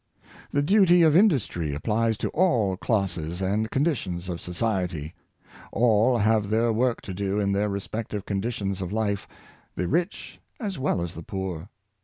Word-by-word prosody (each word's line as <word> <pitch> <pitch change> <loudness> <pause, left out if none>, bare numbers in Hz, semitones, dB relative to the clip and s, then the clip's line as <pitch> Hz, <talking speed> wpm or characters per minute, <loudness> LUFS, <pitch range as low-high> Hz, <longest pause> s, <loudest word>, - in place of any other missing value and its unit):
The 145 - +1
duty 180 0 +5
of 155 -2 +5
industry 125 - +2
applies 110 +7 0
to - - -2
all 120 - +2
classes 90 -5 -1
and 105 +4 0
con 135 +3 +1
ditions 95 - -2
of 85 -1 -4
society. 90 -5 -2 0.6
All 115 +1 +3
have 110 -1 +2
their 115 +1 +2
work 120 +2 +1
to 95 - -7
do 100 +2 -1
in 100 -1 +1
their 100 +1 +1
respective 105 0 -4
conditions 100 -2 -2
of 90 -1 -4
life 105 -2 -1 0.2
— - - -31
the 90 - -1
rich 170 - -2 0.2
as 200 - -4
well 130 -10 0
as 85 0 -5
the 85 - -8
poor. 95 -1 -5
105 Hz, 165 wpm, -26 LUFS, 95-120 Hz, 0.6 s, duty